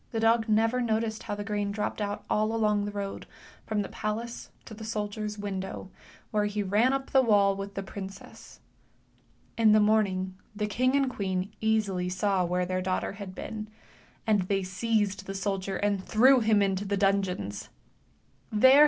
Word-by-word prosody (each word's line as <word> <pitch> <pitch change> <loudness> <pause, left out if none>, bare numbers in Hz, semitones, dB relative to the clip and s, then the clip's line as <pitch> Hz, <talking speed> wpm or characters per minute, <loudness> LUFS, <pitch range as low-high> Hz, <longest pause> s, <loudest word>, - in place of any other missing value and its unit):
dog 225 0 +3
never 225 +3 +3
noticed 225 -1 0
how 205 - -3
the 205 - -4
grain 205 -1 -1
dropped 210 +1 -3
out 205 0 -3
all 215 +1 +1
along 210 -2 +2
the 205 - -3
road 200 -1 -5 0.4
from 210 -1 0
the - - -7
palace 230 +3 -4 0.2
to - - -9
the 220 +1 -9
soldier's 210 -1 -3
window, 190 -2 -5 0.4
where 210 -1 +2
he 205 0 -1
ran 210 +6 +3
up 270 0 -2
the 265 - +6
wall 200 -5 +4
with 200 0 -6
the 195 - -3
princess. 195 0 -9 1.0
In 220 -2 +6
the 215 - +6
morning 200 -3 +2 0.2
the 210 0 -1
king 255 +6 +1
and 280 -1 +4
the 255 - -4
queen 190 0 -2
easily 205 -5 +1
saw 185 0 +1
where 180 +1 0
their 185 +1 -1
daughter 185 0 -1
had 195 -2 -8
been, 215 -1 -6 0.6
and 215 -3 +3
they 195 +1 0
seized 200 +1 -1
the 195 - -4
soldier 195 -1 -2
and 200 -2 0
threw 255 +5 +5
i - - -2
into 200 -3 +3
the 200 0 -1
dungeons. 190 - 0 0.8
Ehere 260 +6 +7
205 Hz, 175 wpm, -28 LUFS, 195-220 Hz, 1.0 s, Ehere